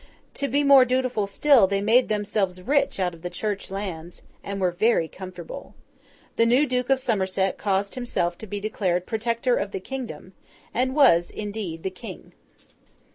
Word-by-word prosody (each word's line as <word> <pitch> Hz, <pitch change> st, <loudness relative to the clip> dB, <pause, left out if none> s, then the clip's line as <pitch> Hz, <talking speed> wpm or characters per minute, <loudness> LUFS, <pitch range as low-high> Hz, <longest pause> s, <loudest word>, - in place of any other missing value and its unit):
To 280 Hz, -, -1 dB
be 285 Hz, +1 st, +1 dB
more 280 Hz, -2 st, +8 dB
dutiful 255 Hz, -4 st, 0 dB
still, 240 Hz, 0 st, +5 dB
they 200 Hz, +1 st, 0 dB
made 225 Hz, +5 st, +3 dB
themselves 205 Hz, -3 st, -1 dB
rich 280 Hz, -2 st, +1 dB
out 180 Hz, -2 st, 0 dB
of 165 Hz, -, -14 dB
the 175 Hz, -, -4 dB
Church 205 Hz, +1 st, -3 dB
lands, 180 Hz, -4 st, -6 dB, 0.2 s
and 200 Hz, 0 st, -5 dB
were 185 Hz, -2 st, +1 dB
very 195 Hz, -2 st, +2 dB
comfortable. 185 Hz, -, -9 dB, 0.6 s
The 230 Hz, -, +4 dB
new 255 Hz, +5 st, +4 dB
Duke 250 Hz, -2 st, -1 dB
of 270 Hz, -1 st, +3 dB
Somerset 190 Hz, -6 st, -1 dB
caused 200 Hz, 0 st, 0 dB
himself 210 Hz, -9 st, -2 dB
to 220 Hz, -, -8 dB
be 205 Hz, +1 st, -4 dB
declared 185 Hz, -4 st, -1 dB
Protector 235 Hz, +2 st, 0 dB
of 200 Hz, -, -2 dB
the 195 Hz, -, -5 dB
kingdom, 195 Hz, -, -7 dB, 0.4 s
and 260 Hz, +2 st, 0 dB
was, 205 Hz, -, +5 dB
indeed, 205 Hz, -6 st, -5 dB
the 190 Hz, -, -2 dB
King. 185 Hz, -, -10 dB
205 Hz, 170 wpm, -24 LUFS, 185-250 Hz, 0.6 s, more